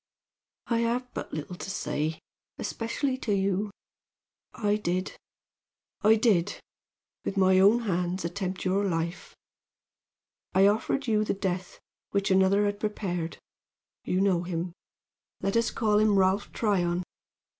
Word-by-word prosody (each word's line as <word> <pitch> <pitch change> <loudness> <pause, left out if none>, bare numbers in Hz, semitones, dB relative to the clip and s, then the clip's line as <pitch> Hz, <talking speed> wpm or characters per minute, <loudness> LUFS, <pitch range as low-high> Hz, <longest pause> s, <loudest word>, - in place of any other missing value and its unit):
"I 230 -1 +1
have 245 +2 -1
but - - -5
little 155 +3 -5
to 185 - -7
say, 155 -2 -2 0.4
especially 255 +3 -2
to 210 -5 0
you. 195 +1 0 0.8
I 210 -3 0
did 185 -2 -2 0.9
I 220 +1 +6
did, 215 -6 +2 0.6
with 195 - -3
my 190 -1 +5
own 205 +5 +6
hands 180 -3 -1
attempt 185 +2 -3
your 190 +2 +2
life! 170 -2 -2 1.2
I 190 +1 +6
offered 220 +6 +1
you 215 -3 +2
the 210 - -1
death 185 -2 -3 0.3
which 200 0 0
another 190 +2 +4
had 205 0 -1
prepared 180 -6 -3 0.7
you 185 - 0
know 190 -3 +3
him 175 0 -3 0.7
let 195 +2 -1
us 230 0 +3
call 210 -2 +2
him 215 -2 +4
Ralph 190 +2 +2
Tryon. 180 -5 +1
195 Hz, 130 wpm, -28 LUFS, 180-215 Hz, 1.2 s, I